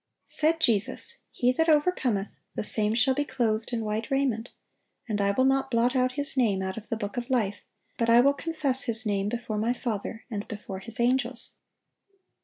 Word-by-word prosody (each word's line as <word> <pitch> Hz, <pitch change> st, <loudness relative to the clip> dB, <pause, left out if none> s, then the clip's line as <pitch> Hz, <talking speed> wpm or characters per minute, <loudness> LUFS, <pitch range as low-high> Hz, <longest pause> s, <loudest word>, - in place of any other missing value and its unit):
(857) -, -, -11 dB
Said 320 Hz, +2 st, +3 dB
Jesus: 235 Hz, -, +1 dB
"He 250 Hz, 0 st, +2 dB
that 325 Hz, +6 st, +1 dB
overcometh, 290 Hz, -, +2 dB, 0.2 s
the -, -, -2 dB
same 215 Hz, 0 st, +2 dB
shall 260 Hz, +3 st, +4 dB
be 290 Hz, +2 st, 0 dB
clothed 225 Hz, -5 st, -1 dB
in 230 Hz, -2 st, -2 dB
white 215 Hz, +1 st, -2 dB
raiment; 260 Hz, -4 st, 0 dB, 0.6 s
and 210 Hz, -3 st, -1 dB
I 200 Hz, -, +2 dB
will 260 Hz, +6 st, +2 dB
not 270 Hz, 0 st, +2 dB
blot 245 Hz, +1 st, +2 dB
out 255 Hz, 0 st, +2 dB
his 285 Hz, +1 st, -2 dB
name 210 Hz, -7 st, +2 dB
out 190 Hz, 0 st, -3 dB
of 225 Hz, 0 st, -9 dB
the 225 Hz, -, -1 dB
book 205 Hz, +1 st, -5 dB
of 240 Hz, +1 st, -3 dB
life, 220 Hz, -6 st, +1 dB, 0.4 s
but 230 Hz, 0 st, +2 dB
I 230 Hz, +1 st, +7 dB
will 280 Hz, +3 st, +5 dB
confess 285 Hz, -3 st, -2 dB
his 230 Hz, -1 st, 0 dB
name 200 Hz, -1 st, 0 dB
before 230 Hz, -2 st, -3 dB
My 230 Hz, +3 st, +1 dB
Father, 225 Hz, -2 st, -4 dB
and 205 Hz, -2 st, -4 dB
before 205 Hz, -3 st, -6 dB
His 225 Hz, +4 st, -8 dB
angels." 245 Hz, 0 st, +1 dB
235 Hz, 200 wpm, -27 LUFS, 215-265 Hz, 0.6 s, I